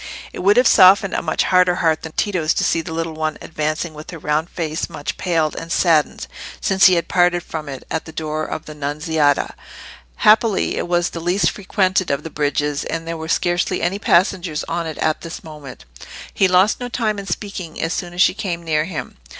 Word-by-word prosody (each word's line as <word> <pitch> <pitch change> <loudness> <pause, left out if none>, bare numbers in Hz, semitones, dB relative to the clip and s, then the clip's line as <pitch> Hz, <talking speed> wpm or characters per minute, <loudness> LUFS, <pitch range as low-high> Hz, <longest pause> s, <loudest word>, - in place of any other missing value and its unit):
It - - -7
would 200 +4 +3
have 250 - +6
softened 195 0 +6
a - - 0
much 160 - 0
harder 180 -1 +3
heart 160 -2 +1
than 160 - -8
Tito's 180 -6 0
to - - 0
see 165 - +1
the 165 - -8
little 165 0 -3
thing 155 -1 -1
advancing 155 +1 -3
with 155 +1 -10
her 170 - -7
round 155 +2 -1
face 160 -2 -3
much 145 - -5
paled 165 -4 0
and 165 0 -7
saddened 165 -5 +2 0.3
since 190 0 +5
he 185 - +4
had 170 -1 -1
parted 175 -1 +2
from 155 -2 -6
it 135 -2 -8
at 160 - -2
the 160 - -9
door 155 -1 -3
of 155 - -5
the 155 - -8
"Nunziata." 150 0 0 0.6
Happily 215 -1 +3
it - - -3
was 175 0 +1
the 170 - -6
least 175 +1 +1
frequented 190 -2 0
of 140 - -1
the 165 - -7
bridges, 145 0 -1
and 165 0 -4
there 165 - -3
were 160 0 -6
scarcely 175 +1 0
any 190 +3 0
passengers 180 -5 +1
on 170 0 -3
it 160 - -6
at 155 -1 0
this 165 0 -8
moment. 150 - -11 0.5
He 195 - +3
lost 185 +3 +3
no 245 0 -5
time 220 -4 -1
in 195 - -8
speaking 180 -3 -5
as 165 - -1
soon 175 - -4
as 180 - +5
she - - +3
came 175 -4 -4
near 155 -2 0
him. 160 - -6
165 Hz, 215 wpm, -20 LUFS, 155-185 Hz, 0.6 s, have